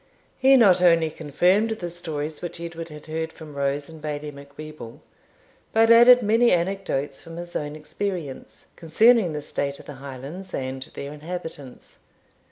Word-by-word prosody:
He 270 +1 +6
not 190 -7 +5
only 165 -3 +4
confirmed 180 +9 +2
the 185 -6 -4
stories 155 -3 -5
which 175 -1 -6
Edward 170 0 -7
had 150 -1 -11
heard 160 +1 -4
from 155 -2 -12
Rose 140 0 -1
and 160 -1 -12
Bailie 150 0 -4
Macwheeble, 140 -3 -11 0.7
but 225 +1 +5
added 240 +1 +8
many 225 +3 +4
anecdotes 170 -6 -1
from 165 0 -10
his 175 0 -8
own 145 0 -3
experience, 155 -2 -5
concerning 200 +3 +4
the 150 -1 -4
state 140 -1 -3
of - - -13
the 145 - -8
Highlands 140 +8 -8
and 130 0 -4
their 140 +1 -6
inhabitants. 155 -4 -8
160 Hz, 155 wpm, -24 LUFS, 145-185 Hz, 0.7 s, added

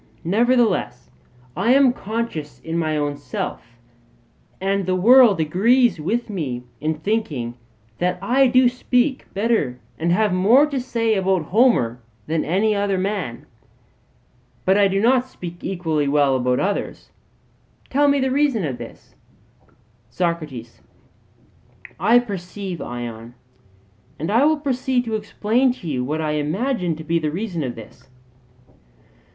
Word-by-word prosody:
Nevertheless 235 +5 +1 0.4
I 240 - +3
am 275 -3 +5
conscious 215 - -5
in 165 - -5
my 155 -2 0
own 145 -1 -2
self, 125 -3 -6 0.8
and 195 0 -1
the 185 - +1
world 230 +1 +6
agrees 205 - +3
with 230 +10 -1
me 145 - -4 0.2
in 155 +1 -1
thinking 155 - -2 0.5
that 180 0 0
I 255 +8 +3
do 255 0 +4
speak 250 +2 0
better 200 - 0 0.2
and 170 +2 0
have 210 +1 +2
more 220 +10 +5
to 280 -3 -3
say 230 -3 0
about 190 -3 +1
Homer 170 - +2 0.2
than 160 0 -1
any 200 +6 +1
other 200 -1 0
man. 185 - -3 1.2
But 190 - +4
I 200 -1 +5
do 195 0 0
not 250 +3 +3
speak 175 -8 -9
equally 160 -6 -1
well 140 -1 +3
about 125 0 +1
others 200 +1 -3 0.8
tell 290 +2 +3
me 280 0 +3
the 265 -1 0
reason 270 - +1
of 130 -4 -4
this. - - -11 1.0
SOCRATES: 150 -6 -4 1.2
I 235 - +5
perceive, 195 -5 -4
Ion; 120 -1 -7 0.8
and 160 +6 -3
I 235 +6 +4
will 310 +1 +3
proceed 260 -3 -1
to 225 - -4
explain 220 +4 +1
to 180 - -10
you 130 -5 -1
what 155 +5 -2
I 155 -1 -1
imagine 175 - -1
to 160 - -9
be 165 +2 0
the 155 -1 -1
reason 180 +1 -4
of 125 -3 -4
this. 115 +3 -14
190 Hz, 140 wpm, -21 LUFS, 155-235 Hz, 1.2 s, world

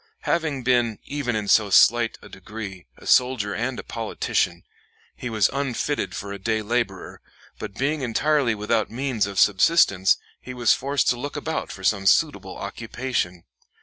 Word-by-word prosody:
Having 155 -6 -1
been, 120 -3 +2
even 140 -5 -2
in 105 -1 -2
so 105 0 +4
slight 115 +4 +4
a - - -11
degree, 95 -2 -9
a - - -15
soldier 125 -5 +2
and 120 +4 -2
a - - -6
politician, 115 -2 -2 0.5
he 125 - -6
was 110 -3 +3
unfitted 140 +1 -2
for 100 -1 -5
a 100 - -7
day 110 +2 -1
laborer; 110 -4 -3 0.4
but - - -7
being 145 +3 -1
entirely 130 0 +1
without 105 +1 0
means 125 -4 -1
of 100 -1 -7
subsistence, 100 - +4 0.2
he 125 - -8
was 120 -2 +4
forced 140 -1 0
to 125 - 0
look 145 +3 -5
about 160 +2 -3
for 95 - -10
some 95 0 +1
suitable - - +2
occupation. 115 -7 -4
115 Hz, 160 wpm, -24 LUFS, 105-130 Hz, 0.5 s, so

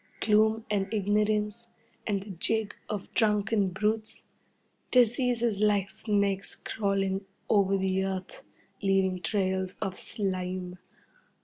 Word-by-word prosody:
Gloom 220 +1 +3
and 195 -2 0
ignorance, 210 +1 +1 0.4
and 200 -3 0
the 205 - -9
jig 210 +4 0
of 205 -3 -5
drunken 210 -2 +2
brutes. 215 +4 -2 0.7
Diseases 240 -3 +3
like 205 -2 +2
snakes 200 -3 0
crawling 195 -2 -1 0.2
over 195 -2 +3
the 190 0 +1
earth, 190 -1 -4 0.4
leaving 190 -2 +2
trails 190 -2 -1
of 195 -3 -3
slime. 185 -2 -3
200 Hz, 105 wpm, -29 LUFS, 190-215 Hz, 0.7 s, Gloom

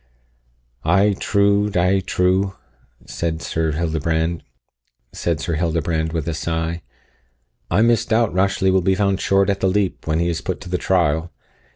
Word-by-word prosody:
"Ay, 100 +5 +3
true, 100 0 +2
Die, 95 0 +2
true," 95 +1 0 0.5
said 80 -1 -3
Sir 80 -1 -2
Hildebrand, 80 +1 -1 1.7
with 80 -1 -3
a 85 - -1
sigh, 80 +1 -3 0.9
"I 100 +6 +3
misdoubt 115 -1 +2
Rashleigh 95 +1 +2
will 95 0 +3
be 95 +2 +2
found 100 0 0
short 95 0 +2
at 100 - -3
the 95 - +1
leap 95 -3 -1
when 80 0 +1
he 85 +1 +1
is 85 -2 -2
put 95 - -4
to 95 - -9
the 90 0 -1
trial. 85 -2 +1
90 Hz, 140 wpm, -20 LUFS, 80-100 Hz, 1.7 s, Ay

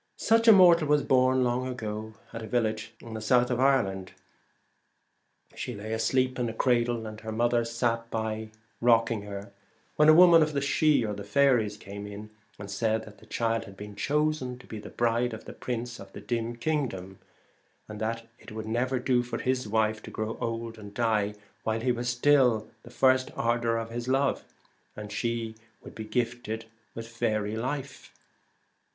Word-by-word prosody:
Such 230 +1 +3
a - - +11
mortal 175 -5 +7
was 150 -1 +3
born 130 0 +3
long 125 +1 0
ago 110 -3 -5 0.2
at 115 - -5
a 110 - -6
village 110 -2 -1
in 115 - -9
the 110 - -5
south 125 +3 +3
of 125 - 0
Ireland. 100 -9 +1 1.4
She 125 - -5
lay 110 +2 -5
asleep 130 +3 +1
in 120 -1 0
a 110 - -7
cradle, 120 -2 +1
and 110 0 -8
her 110 0 -5
mother 120 +1 +2
sat 115 0 -1
by 110 -1 -3 0.3
rocking 115 -2 +3
her, 100 0 -7 0.5
when 150 +1 +6
a - - +9
woman 170 -1 +8
of 155 0 +1
the 140 - +1
Sidhe 140 -6 +2
(the 100 - -7
faeries) 110 -2 +2
came 100 +1 -8
in, 105 +1 -9 0.3
and 100 0 -8
said 110 +2 0
that 105 -1 -14
the - - -18
child 115 -1 -1
was 105 - -6
chosen 150 -3 0
to 130 - -16
be 110 - -7
the - - -9
bride 120 0 0
of 110 - -12
the - - -8
prince 120 -1 -5
of 95 - -11
the - - -8
dim 120 0 -3
kingdom, 115 -10 -3 0.7
but 105 -1 -8
that 115 +2 -2
as - - -25
it - - -13
would 110 0 -6
never 125 +4 0
do 125 0 +2
for 125 0 -4
his 130 -2 -1
wife 110 0 +1
to - - -9
grow 110 +1 -4
old 115 -1 -4
and 100 -1 -11
die 110 -3 +1 0.3
while 110 0 -1
he 125 +1 +2
was 120 0 -2
still 125 -2 +4
in 110 - -19
the 120 - -14
first 130 +1 +3
ardour 115 0 +1
of 115 0 -4
his 120 +1 -4
love, 135 +1 +1 0.7
she 115 +2 -2 0.3
would - - -11
be 110 - -7
gifted 115 0 -2 0.3
with 115 - -6
a - - -13
faery 110 -2 -1
life. 135 +4 -5
115 Hz, 185 wpm, -28 LUFS, 110-125 Hz, 1.4 s, a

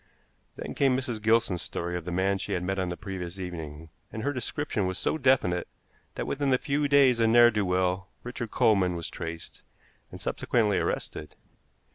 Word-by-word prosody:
Then - - -6
came 135 -2 +3
Mrs. 125 -5 -3
Gilson's 110 -5 +2
story 85 +1 -4
of 90 -2 -4
the 90 - -4
man 95 +2 +1
she - - -3
had 90 - -1
met 95 +1 -1
on 95 -1 -1
the 90 - -4
previous 95 -3 -6
evening, 80 -3 -7 0.2
and 110 - -5
her 145 - 0
description 125 -5 -2
was 95 0 -3
so 100 - 0
definite 90 - +2 0.5
that - - -3
within 140 -1 0
a 130 - +5
few 145 +3 0
days 140 -4 +5
a 115 - +4
ne'er 120 +1 +7
do 105 -2 0
well, 90 +1 0 0.2
Richard 120 -1 -5
Coleman, 95 -6 +3
was 85 -1 -5
traced, 85 -1 -7 0.5
and - - -10
subsequently 105 -4 +1
arrested. 75 - -3
100 Hz, 185 wpm, -28 LUFS, 90-120 Hz, 0.5 s, ne'er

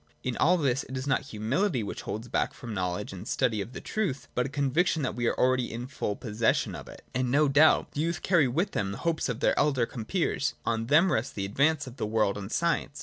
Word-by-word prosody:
In 125 -2 -2
all 180 +4 +4
this 135 -4 +1
it 130 - -6
is 130 - -4
not 135 -1 +1
humility 125 - 0
which 100 - -5
holds 110 +3 -5
back - - -1
from 120 -4 -8
the - - -3
knowledge 90 -2 -2
and - - -8
study 110 -3 +1
of 110 +5 -7
the - - -6
truth, 140 - -2
but 125 +1 0
a - - -7
conviction 145 +3 +1
that 130 - -1
we 120 -1 -1
are - - +1
already 130 -1 +2
in 120 +2 -5
full 125 -5 -3
possession 110 0 0
of - - -8
it. - - -12
And 125 0 0
no 145 +4 +4
doubt 145 +3 +4
the 145 - -2
young 165 +1 +1
carry 175 -6 +2
with 170 +11 0
them 100 -2 -2
the - - -6
hopes 165 -4 0
of 125 +1 -3
their - - +3
elder 135 -5 +2
compeers; 140 - -1
on 115 0 -1
them 165 +7 +5
rests 115 +5 -1
the 100 - -3
ad 100 - -8
vance 150 +1 +3
of 130 0 -10
the - - -2
world 105 -2 +1
and 100 +1 -6
science. 170 -4 0
130 Hz, 255 wpm, -28 LUFS, 115-150 Hz, -, them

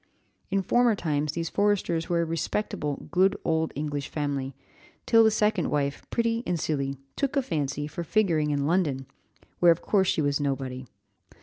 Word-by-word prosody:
"In 195 0 0
former 240 +1 +3
times 150 -4 -1
these 165 0 -3
Forresters 200 -5 +1
were 170 -1 +2
a - - -1
respectable, 160 -2 -3
good 185 +2 +3
old 160 0 +1
English 145 0 -3
family, 140 -3 -3 0.5
till 225 -1 +6
the 220 - +6
second 210 -4 +1
wife, 140 -1 -1
pretty 230 -1 0
and 175 -2 0
silly, 140 -3 -2 0.2
took 275 0 -1
a 275 - +3
fancy 145 - -2
for 150 +3 -5
figuring 170 -6 +1
in 140 -1 0
London, 150 -5 +1 0.5
where 175 -1 +7
of 165 - 0
course 195 -3 +2
she 155 - +1
was 145 0 +1
nobody. 135 -2 -3
160 Hz, 170 wpm, -27 LUFS, 145-195 Hz, 0.5 s, where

